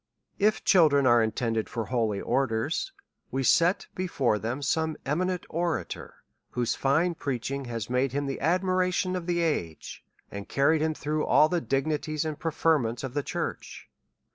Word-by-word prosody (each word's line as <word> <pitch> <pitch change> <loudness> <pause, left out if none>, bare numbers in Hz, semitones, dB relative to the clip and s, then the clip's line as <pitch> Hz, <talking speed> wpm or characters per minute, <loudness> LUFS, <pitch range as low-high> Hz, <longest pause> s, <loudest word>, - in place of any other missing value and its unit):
If 215 +1 +2
cliildren 150 -7 +5
are 120 -2 +5
intended 110 0 -1
for 115 -1 -3
holy 115 -5 0
orders, 115 -3 -1 0.4
we 135 +1 -2
set 170 +7 +3
be 185 0 -3
fore 120 -10 +1
them 120 +7 -3
some 160 +2 0
eminent 180 +5 -1
orator, 170 -1 -4 0.3
whose 120 -2 -1
fine 160 +6 +1
preaching 140 -2 -3
has 115 -3 -4
made 125 +1 0
him 145 +2 -2
the 135 -1 -3
admiration 185 +2 +1
of 180 -1 -4
the 175 -1 +1
age, 90 - -3 0.3
and 100 0 -7
carried 150 +3 +3
him 155 0 0
through 150 +1 -2
all 155 - +5
the 175 0 0
dignities 150 +2 -1
and 155 -1 -4
preferments 155 -7 0
of 130 -2 -5
the 145 - 0
church. - - -5
145 Hz, 160 wpm, -27 LUFS, 125-165 Hz, 0.4 s, cliildren